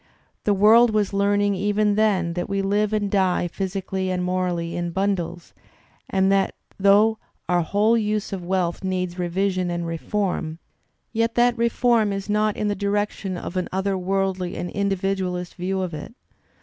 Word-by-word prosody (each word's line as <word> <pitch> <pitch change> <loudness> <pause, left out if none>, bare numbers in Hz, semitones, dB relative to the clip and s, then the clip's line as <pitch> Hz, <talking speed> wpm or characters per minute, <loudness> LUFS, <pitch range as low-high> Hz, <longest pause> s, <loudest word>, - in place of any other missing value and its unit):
The 205 - +3
worid 225 +4 +6
was 210 -2 0
learning 205 0 +2
even 205 +2 +1
then 200 -5 +2
that 175 +2 -3
we 195 0 0
Uve 205 +2 +1
and 205 -2 -1
die 185 -3 +2
physically 190 +1 -3
and 180 -1 -1
morally 180 -2 -1
in 175 0 -2
bimdles, 175 -2 -2 0.6
and 190 0 +2
that 195 0 +2 0.2
though 205 +3 +4 0.3
our 175 -1 +2
"whole 205 +7 +2
use 215 -2 -1
of 185 -2 -4
wealth 180 -1 -1
needs 185 -1 -2
revision 185 +1 0
and 175 0 -2
reform," 165 -1 -2 0.6
yet 230 0 0
that 240 0 +4
refOTm 235 -2 +2
is 195 +1 -4
not 210 0 +1
in 210 - -1
the 205 - +1
direction 200 -1 -2
of 175 - -6
an 180 - -1
other 190 +1 0
worldly 190 -1 -1
and 175 - -4
individ 195 -1 0
ualist 180 -1 -3
view 190 +1 -2
of 175 -3 -4
it. 155 +9 -8
195 Hz, 165 wpm, -23 LUFS, 180-205 Hz, 0.6 s, worid